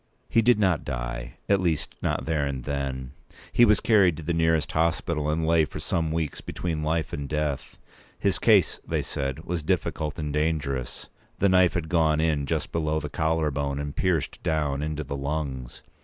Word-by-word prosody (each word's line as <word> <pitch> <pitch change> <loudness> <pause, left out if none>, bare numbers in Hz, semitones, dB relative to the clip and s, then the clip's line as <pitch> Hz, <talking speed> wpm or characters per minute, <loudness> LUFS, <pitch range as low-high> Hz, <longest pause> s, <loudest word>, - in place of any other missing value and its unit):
He 115 - +4
did 120 +1 +5
not 95 -7 +2
die—at 60 +9 -2
least, 80 -6 -1
not - - -1
there 80 -2 0
and 70 -3 -3
then. 65 -2 -3 0.4
He 120 - +6
was 105 -2 +4
carried 100 -8 +4
to 80 - -7
the 85 +3 -1
nearest 80 -2 +2
hospital, 80 -2 0
and 80 +1 0
lay 80 0 +4
for 75 - -5
some 80 -2 -1
weeks 80 -3 -2
between 80 -3 -3
life 80 +1 -1
and 70 -1 -4
death. 75 -2 -2 0.4
His - - +1
case, - - +4
they - - -1
said, 70 +3 -4
was 90 -2 -2
difficult 75 0 -1
and 75 -3 -3
dangerous. 75 -5 -1 0.3
The 100 - +3
knife 90 -1 +4
had 85 -3 -1
gone 80 -2 +2
in 75 -3 +1
just - - -2
below 80 -1 0
the 75 -1 -5
collarbone, 75 -3 0
and 70 0 -4
pierced 85 -7 0
down 75 -3 0
into 75 0 -2
the 70 0 -5
lungs. 70 -3 -4
75 Hz, 180 wpm, -26 LUFS, 70-80 Hz, 0.4 s, He